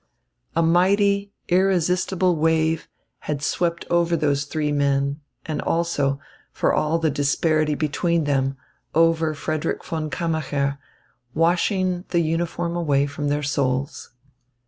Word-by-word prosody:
A 165 - +3
mighty, 200 +4 +3 0.2
irresistible 185 0 +2
wave 160 0 +1 0.4
had 145 -1 -2
swept 170 +2 -1
over 170 -1 +2
those 145 -1 0
three 150 0 -2
men 140 0 0 0.2
and 155 -2 -3
also, 145 -5 0 0.3
for - - +1
all 155 +2 +1
the 160 -2 +1
disparity 150 +2 +1
between 165 +3 0
them, 135 -2 0 0.4
over 165 -1 +3
Frederick 155 +1 -3
von 155 -2 -3
Kammacher, 145 -4 -1 0.6
washing 180 +2 +1
the 170 - +2
uniform 170 +1 -1
away 145 -5 +2
from 145 +1 -4
their 145 +1 0
souls. 135 0 -1
160 Hz, 120 wpm, -23 LUFS, 145-170 Hz, 0.6 s, A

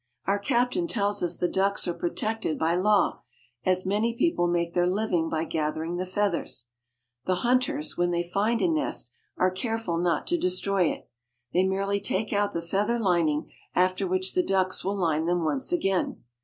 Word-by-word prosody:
Our 200 +1 +1
captain 250 - +1
tells 205 -7 +1
us 175 -1 0
the 175 - +1
ducks 195 +1 +1
are 175 - 0
protected 210 0 -2
by 160 +1 +1
law, 200 +3 +2 0.4
as 185 0 +2
many 215 +4 +1
people 235 - +2
make 170 -1 0
their 175 0 +2
living 180 -4 0
by 160 0 -1
gathering 160 +1 -2
the 185 +1 -3
feathers. 185 - -1 0.6
The 185 - +3
hunters, 255 +5 +1
when 175 0 +2
they 175 0 0
find 210 +6 +1
a - - +4
nest, 315 -3 -1 0.3
are 185 0 +3
careful 225 -3 -2
not 175 -1 +1
to 345 0 0
de - - +1
stroy 185 -1 +1
it. - - -8 0.5
They 180 - +4
merely 195 +1 0
take 205 +2 -1
out 205 0 +1
the 170 - -3
feather 205 +7 0
lining, 170 -8 +1 0.2
after 185 +1 +2
which 185 +1 0
the 180 - +3
ducks 185 0 0
will 200 +2 -1
line 160 -4 +1
them 175 -1 +1
once 265 - -1
again. 195 - 0
185 Hz, 185 wpm, -27 LUFS, 175-210 Hz, 0.6 s, a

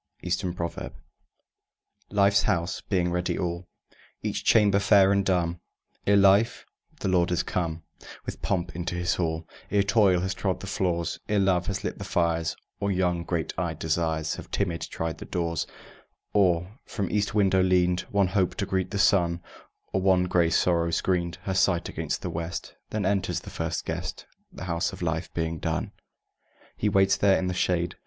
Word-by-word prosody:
Eastern 90 - -1
Proverb 85 -1 -5 1.1
Life's 100 0 +4
House 85 +1 0
being 90 -3 0
ready 90 0 -1
all, 85 0 -3 0.6
Each - - -2
chamber 100 -2 +5
fair 100 -1 +5
and 100 0 +3
dumb, 85 -3 0 0.5
Ere 100 0 +6
life, 100 +3 +4 0.4
the - - -1
Lord, 90 -2 +3
is 90 - +1
come 85 -2 -2 0.4
With - - -6
pomp 85 -2 -1
into 90 +1 -3
his 90 0 0
hall, 80 -2 -2 0.2
Ere 100 -1 +3
Toil 100 -3 +4
has 95 0 -1
trod 95 0 -1
the - - -7
floors, 85 -4 -1
Ere 105 - +2
Love 95 -3 +2
has 100 -1 -2
lit - - -4
the - - -4
fires, 85 -3 0 0.2
Or 100 0 0
young 90 -2 +1
great 85 -3 -2
eyed - - -2
Desires 80 -1 -1
Have, - - -9
timid, 85 -4 -1
tried 80 -1 -4
the - - -7
doors; 85 -2 -2 0.7
Or 95 +2 +2
from 100 -4 -3
east 105 +1 0
window 95 -2 +4
leaned 90 -1 +3
One 100 -2 +2
Hope, 95 -1 +1
to 100 - -1
greet 95 -1 -1
the 105 - -3
sun, 85 -4 +3 0.5
Or 95 - +1
one 95 -1 +4
gray 90 -2 +2
Sorrow 85 0 +2
screened 85 0 0
Her 95 - -2
sight 95 -2 +2
against - - -3
the - - -3
west, 85 +1 -5 0.2
Then 105 -2 -2
enters 95 -1 0
the - - -10
first - - -3
guest, - - -4 0.3
The - - -9
House 85 -1 -1
of - - -6
life 80 +1 -2
being 80 -1 -2
done. - - -2 0.8
He 105 - 0
waits 95 -1 +4
there 100 -1 +4
in 95 - -1
the 90 - -1
shade. 85 -1 0
90 Hz, 175 wpm, -27 LUFS, 85-100 Hz, 1.1 s, Ere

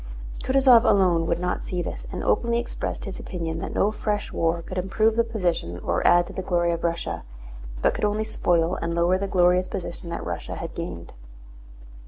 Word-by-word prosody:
Kutúzov 260 -3 +6
alone 180 -7 +3
would 170 - +1
not 180 +1 -2
see 180 -1 -3
this - - -6
and - - -4
openly 235 0 +2
expressed 240 - -4
his 195 - -6
opinion 165 -3 -4
that - - -5
no 205 - +3
fresh 210 -1 -2
war 165 0 0
could 185 +2 -4
improve 215 +4 +1
the 235 - +4
position 175 - -2
or - - -1
add 175 0 +6
to - - -10
the - - -3
glory 175 -2 +1
of 170 0 -3
Russia, 170 0 -2 0.6
but - - +4
could - - -1
only 210 +1 0
spoil 175 -5 +1
and 170 0 -2
lower 175 +2 +2
the 200 - -2
glorious 180 -1 +3
position 170 -1 -5
that 170 - -4
Russia - - -4
had 165 0 -6
gained. 85 - -6
180 Hz, 195 wpm, -25 LUFS, 170-210 Hz, 0.6 s, Kutúzov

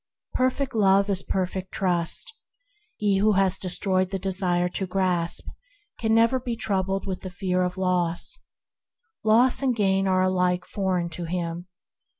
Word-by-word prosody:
Perfect 260 +1 0
Love 200 -2 +3
is 190 -1 +1
perfect 185 0 -3
Trust. 175 - -1 0.6
He 200 -2 +1
who 215 +1 +3
has 195 -2 +2
destroyed 185 0 0
the 195 - -2
desire 185 -2 0
to 190 +1 -4
grasp 180 -2 0 0.5
can 220 -1 +2
never 230 +3 +4
be 245 -2 -4
troubled 195 -3 -1
with 190 -2 -4
the 185 - -6
fear 185 0 -1
of 180 0 -2
loss. 180 - -1 0.8
Loss 235 +5 +4
and 260 -3 +1
gain 195 -2 +1
are 185 -1 +3
alike 180 -1 +1
foreign 185 -3 -1
to 170 +1 -5
him. 170 0 -4
190 Hz, 150 wpm, -25 LUFS, 180-205 Hz, 0.8 s, never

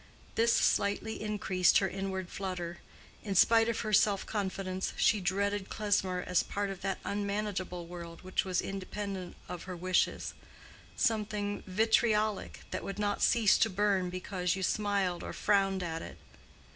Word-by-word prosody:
This 230 +1 +3
slightly 205 0 +1
increased 195 -4 +2
her 195 - +2
inward 190 -2 -4
flutter. 175 -3 -4 0.4
In 200 -3 -3
spite 225 +4 +6
of 230 - -1
her 215 -1 -3
self 205 -1 +4
confidence, 190 -2 -2
she 210 - +3
dreaded 200 +2 0
Klesmer 190 -4 0
as 180 -1 +3
part 200 -1 -3
of 190 - -8
that 195 0 -1
unmanageable 200 -3 -2
world 170 0 -9
which 185 0 0
was 185 -1 0
independent 195 -1 -5
of 180 -1 -6
her 185 -1 -5
wishes—something 205 +3 -2
vitriolic 215 +1 +1
that - - -3
would 195 - -5
not 205 -1 -1
cease 225 -4 +4
to 225 - +4
burn 195 -2 +1
because 180 0 -2
you 190 - -4
smiled 200 -3 0
or - - -5
frowned 195 -2 +2
at 165 -1 -3
it. - - -9
195 Hz, 145 wpm, -31 LUFS, 185-210 Hz, 0.4 s, spite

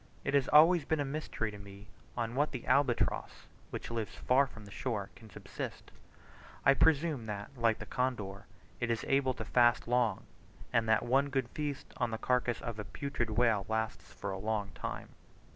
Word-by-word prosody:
It 135 - -1
has 140 -2 +3
always 160 +2 +7
been 160 +2 0
a 145 - 0
mystery 135 -6 -3
to 105 - -10
me 100 0 -11 0.3
on 115 -1 -1
what 145 +4 +1
the 125 - -5
albatross, 130 -2 +1 0.2
which - - -6
lives 115 -2 -3
far 135 +2 +3
from 110 -4 -12
the 100 - -12
shore, 105 -4 -3
can 110 - -14
subsist; - - -7 0.7
I 135 - +8
presume 150 -4 +2
that, 105 +2 -5
like 115 -3 +2
the - - -7
condor, 110 -7 -2 0.3
it 120 - -1
is 115 -1 -1
able 135 -2 +2
to 110 - -5
fast 120 0 +3
long; 120 -2 +1 0.5
and 115 -1 +2
that 110 +1 +4
one 135 +4 +2
good 135 -3 -1
feast 145 0 -4
on 120 -2 0
the 110 - -3
carcass 125 0 0
of 115 -2 -5
a - - -2
putrid 135 -1 -3
whale 110 -2 +2
lasts 110 0 -2
for 100 - -5
a 95 - -4
long 105 -1 -2
time. - - -5
120 Hz, 190 wpm, -32 LUFS, 110-135 Hz, 0.7 s, I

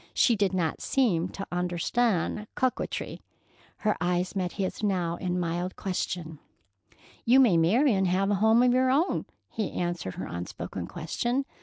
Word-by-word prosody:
She 235 - +4
did 200 -3 +1
not 175 -4 -1
seem 185 -10 +1
to 195 - -6
understand 180 +4 0
coquetry. 255 -1 -2 0.6
Her 210 - +3
eyes 180 +2 0
met 180 -2 -1
his 195 -1 -3
now 180 -5 0
in 180 0 -2
mild 175 +1 -2
question. 175 -4 -3 0.8
"You 250 +3 +5
may 235 -9 +5
marry 220 - +4
and 190 -1 +2
have 195 +3 +1
a 200 -1 0
home 220 +2 +5
of 250 -1 +4
your 255 +1 +3
own," 300 +8 +1 0.2
he 215 -3 -3
answered 175 - -3
her - - -5
unspoken 85 +1 -6
question. 240 - -2
185 Hz, 155 wpm, -27 LUFS, 175-230 Hz, 0.8 s, You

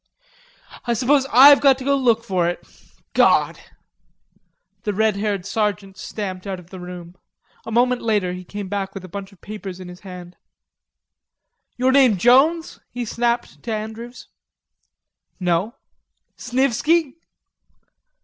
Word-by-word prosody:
"I 235 - +1
suppose 270 +3 +2
I've 280 +4 +8
got 275 -2 +5
to 265 - -8
go 280 +1 +2
look 235 -4 +2
for 185 -5 0
it.... 175 - -6 0.5
God!" - - +3 1.2
The 210 -3 -2
red 220 0 +2
haired 200 -3 -2
sergeant 200 -2 -2
stamped 190 -1 -6
out 195 -1 -3
of 180 0 -17
the 190 - -9
room. 180 -1 -9 0.5
A - - -5
moment 245 +2 +2
later 205 -5 0
he 180 0 -7
came 205 +2 -7
back 195 0 -4
with 190 -1 -7
a - - -9
bunch 200 +2 -8
of 195 - -22
papers 200 -3 -8
in 185 -1 -9
his 180 0 -11
hand. 180 -2 -11 1.4
"Your 255 +1 +2
name 260 -6 +5
Jones?" 275 - +3
he 245 0 -5
snapped 235 +1 -2
to 235 - -5
Andrews. 220 +3 -6 1.1
"No." 180 +6 0 0.6
"Snivisky?" 270 +5 +1
215 Hz, 140 wpm, -21 LUFS, 185-245 Hz, 1.4 s, I've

